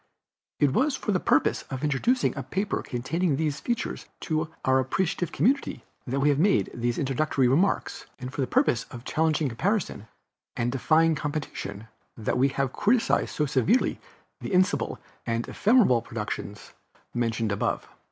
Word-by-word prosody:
It 140 -3 +3
was 300 - +2
for 210 - -2
the 185 - +2
purpose - - +2
of 130 0 -5
introducing 150 - +1
a - - -3
paper 195 +1 -2
containing 145 +6 -1
these 150 -1 -1
features 235 +9 -3
to 155 0 -1 0.2
our 130 0 +4
appreciative 175 +5 -1
community 260 - +1 0.2
that 135 +3 -1
we 145 +2 +3
have 145 -1 +2
made 195 +4 +3
these 120 0 -1
introductory 135 -1 +1
remarks, 165 +11 +1
and 125 +1 -7
for 145 - -2
the 130 - 0
purpose 120 - +2
of 120 +1 -11
challenging 155 -1 +1
comparison, 160 - -1 0.5
and 120 0 0
defying 160 +5 +3
competition, 145 -9 -4 0.3
that 115 +2 -1
we 135 - +5
have 135 -1 -1
criticized 230 +2 +2
so 150 - +1
severely 145 - +2 0.4
the - - -5
imbecile 185 0 +2 0.3
and 115 0 -1
ephemeral 205 - +4
productions 105 -3 -6 0.4
mentioned 115 -2 0
above. 100 - -1
145 Hz, 150 wpm, -26 LUFS, 125-180 Hz, 0.5 s, we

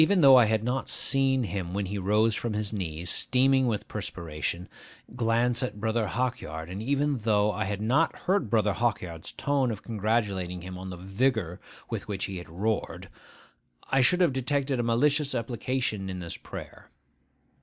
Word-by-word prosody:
Even 190 +2 +3
though 135 -3 +9
I 125 -3 +7
had 110 0 +1
not 125 +3 -2
seen 135 -1 +3
him 95 -3 -4
when 100 0 -1
he 100 +2 -3
rose 105 +4 +3
from 115 +1 -2
his 105 0 -1
knees, 85 -4 -4
steaming 130 +6 +3
with 110 -3 -2
perspiration, 80 +2 -4 0.5
glance 120 +1 +1
at 125 -5 -3
Brother 110 0 0
Hawkyard, 95 -9 -3
and 95 +3 -5
even 140 +3 +1
though 105 -1 +2
I 105 0 -2
had 100 0 -3
not 140 +9 +2
heard 185 - 0
Brother 105 -2 +2
Hawkyard's 90 -8 -2
tone 140 -3 +1
of 110 -3 -5
congratulating 100 -5 -1
him 90 0 -7
on 95 +1 -7
the 90 - -7
vigour 95 -1 -1 0.3
with - - -4
which 100 -2 -2
he 95 -2 -5
had 90 - -9
roared, 100 +6 -2 0.8
I 135 0 +4
should 180 +9 +3
have 170 -7 +4
detected 135 0 0
a 120 -1 0
malicious 140 +4 +2
application 115 -3 -2
in 95 - -4
this 85 -2 -6
prayer. - - -10
110 Hz, 175 wpm, -28 LUFS, 95-130 Hz, 0.8 s, though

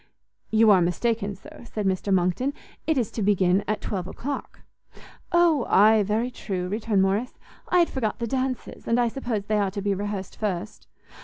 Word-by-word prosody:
"You 220 0 +5
are 190 -3 +6
mistaken, 200 +4 0
sir," - - -14
said 210 -3 -4
Mr 190 +1 0
Monckton; 190 - +1 0.3
"it 315 -3 +2
is 235 -5 0
to 225 - -4
begin 195 -1 +3
at 215 - -1
twelve 185 -3 -3
o'clock." 275 +8 -6 0.7
"O 340 -7 +3
ay, 215 +2 +6
very 215 +5 0
true," 185 -6 -4
returned 210 0 +1
Morrice; 200 +6 -1 0.3
"I 360 - +3
had 345 -1 +4
forgot 225 -6 -2
the 235 - -2
dances, 255 +1 -3
and 230 +1 +2
I 240 - +3
suppose 230 -4 -3
they 215 0 +1
are 200 -1 +1
to 200 +1 -5
be 200 -1 +1
rehearsed 200 -1 -4
first. 205 -1 -4
210 Hz, 180 wpm, -25 LUFS, 195-240 Hz, 0.7 s, are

